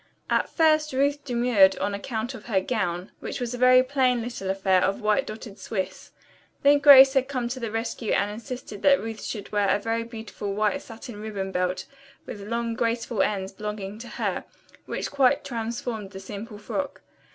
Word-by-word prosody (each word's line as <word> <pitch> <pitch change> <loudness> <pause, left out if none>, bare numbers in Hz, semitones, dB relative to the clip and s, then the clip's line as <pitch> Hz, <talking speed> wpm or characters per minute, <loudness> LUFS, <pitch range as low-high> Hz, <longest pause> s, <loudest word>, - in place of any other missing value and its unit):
At - - +2
first 310 -3 +3
Ruth 285 +2 +1
demurred 235 -7 +4
on 205 - -1
account 220 +4 -3
of 250 - -10
her 205 -5 +2
gown, 185 -3 -2
which - - -5
was 245 -1 -3
a - - -4
very 255 0 +7
plain 255 -3 +1
little 230 -5 -5
affair 190 -1 +2
of 195 +1 0
white 215 -2 +1
dotted 215 -2 -8
swiss. 190 -2 -4 0.5
Then 285 +1 +6
Grace 270 -2 +9
had 265 -1 +2
come 255 -4 -2
to 255 +1 -4
the 230 -2 -3
rescue 225 0 -3
and 205 +1 +1
insisted 230 -2 -7
that 280 -1 +5
Ruth 225 0 -6
should 210 -3 -5
wear 205 -1 +2
a - - +4
very 225 +2 -1
beautiful 220 -3 -6
white 215 +7 +1
satin 225 -2 -10
ribbon 200 -3 -4
belt 180 0 -1 0.4
with 205 - -7
long, 230 +3 -2
graceful 230 -1 -1
ends, 195 -2 -1
belonging 210 0 -6
to 235 - -8
her, - - -3 0.4
which - - -3
quite 280 0 +3
transformed 230 -3 -4
the 190 0 -9
simple 205 +2 -8
frock. 280 +7 -4
225 Hz, 185 wpm, -26 LUFS, 205-255 Hz, 0.5 s, Grace